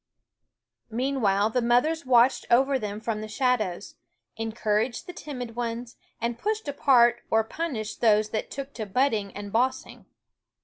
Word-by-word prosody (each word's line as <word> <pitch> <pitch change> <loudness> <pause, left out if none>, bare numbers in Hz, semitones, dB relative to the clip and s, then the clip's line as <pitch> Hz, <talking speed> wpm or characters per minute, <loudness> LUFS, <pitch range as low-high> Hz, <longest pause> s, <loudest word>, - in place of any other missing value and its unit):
Meanwhile 225 -4 +1
the 250 - +1
mothers 255 +6 +2
watched 245 +1 +4
over 265 +3 +4
them 210 -2 -4
from 220 -1 -3
the 215 - -5
shadows, 215 -6 -1 0.4
encouraged 225 +3 -1
the 360 - -8
timid 250 -8 -7
ones, 235 0 -4 0.2
and 235 0 -2
pushed 430 -1 -2
apart 240 -4 +4
or 225 0 +3
punished 225 -4 -4
those 215 -2 +4
that 220 - -3
took 275 +1 -7
to 220 -3 -5
butting 215 -2 +1
and 205 0 -7
bossing. 255 +3 -1
235 Hz, 140 wpm, -26 LUFS, 215-260 Hz, 0.4 s, watched